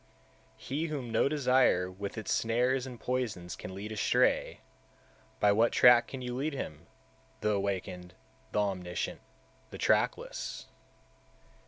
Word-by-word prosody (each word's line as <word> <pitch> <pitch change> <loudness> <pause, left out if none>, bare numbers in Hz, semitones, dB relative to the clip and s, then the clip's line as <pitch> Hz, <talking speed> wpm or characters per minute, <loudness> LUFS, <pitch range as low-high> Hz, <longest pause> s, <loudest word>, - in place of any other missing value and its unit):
180. 135 - -7
He 160 +3 0
whom 135 -7 -4
no 115 +4 +3
desire 130 -10 +3
with 100 +3 -6
its 110 - -2
snares 125 +3 +1
and 125 -3 -9
poisons 110 -9 -3
can 95 - -8
lead 105 +3 -6
astray, 110 - +1 0.8
by 105 - +5
what 115 +3 +3
track 120 -1 +6
can 130 -2 -7
you 125 0 -4
lead 145 +4 -2
him, 80 - -6 0.5
the 105 -1 +1
Awakened, 95 -3 -3 0.4
the - - 0
Omniscient, 90 -4 -2 0.5
the - - -8
trackless? - - 0
110 Hz, 135 wpm, -31 LUFS, 95-125 Hz, 0.8 s, track